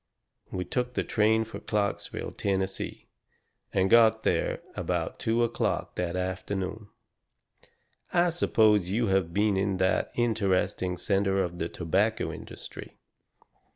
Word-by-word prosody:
We 90 -1 -3
took 125 -1 -2
the - - +1
train 110 +1 +2
for 110 - -8
Clarksville, 105 -2 -2
Tennessee, 95 -1 -2 0.7
and 95 -1 +2
got 110 0 +5
there - - 0
about - - -2
two 115 +1 +1
o'clock 115 - -1
that 90 -1 -2
afternoon. 95 +3 -3 1.2
I 175 0 +3
suppose 110 - +3
you 110 +2 +1
have 95 -3 +1
been 105 +2 +2
in 95 0 0
that 95 0 +1
interesting 95 -5 +1
centre 95 +1 +1
of 85 -1 -5
the 85 - -2
tobacco 95 +7 0
industry. - - -10
100 Hz, 120 wpm, -28 LUFS, 95-110 Hz, 1.2 s, got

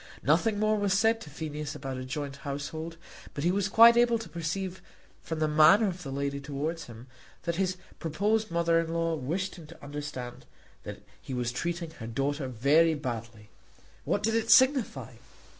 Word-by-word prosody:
Nothing 220 -3 +2
more 215 0 +2
was 200 -2 +1
said 225 +2 +2
to 155 - -9
Phineas 150 0 -5
about 135 -2 -5
a 130 - -5
joint 140 +1 -5
household; 145 +4 -5 0.4
but 140 - -3
he 175 - +3
was 195 +1 0
quite 230 +3 +8
able 240 -1 +4
to 225 -5 -8
perceive 175 +3 -4 0.4
from 160 - -5
the 155 0 +1
manner 155 +8 +6
of 180 -1 -4
the 140 -5 -6
lady 140 +1 -2
towards 150 +4 -4
him 115 0 -11 0.4
that 170 0 -2
his 185 -1 0 0.2
proposed 210 +7 0
mother 170 0 +2
in 165 -1 -2
law 165 0 0
wished 170 +7 -3
him 165 -3 -11
to 170 0 -15
understand 140 -4 -7 0.4
that - - -8 0.2
he 130 - -6
was 120 -1 -1
treating 170 +5 -3
her 115 - -6
daughter 135 +4 -2
very 145 +7 +3
badly. 115 -6 -6 0.5
What 200 - -1
did 225 +1 +1
it 225 0 0
signify? 225 - +4
160 Hz, 180 wpm, -29 LUFS, 140-190 Hz, 0.5 s, quite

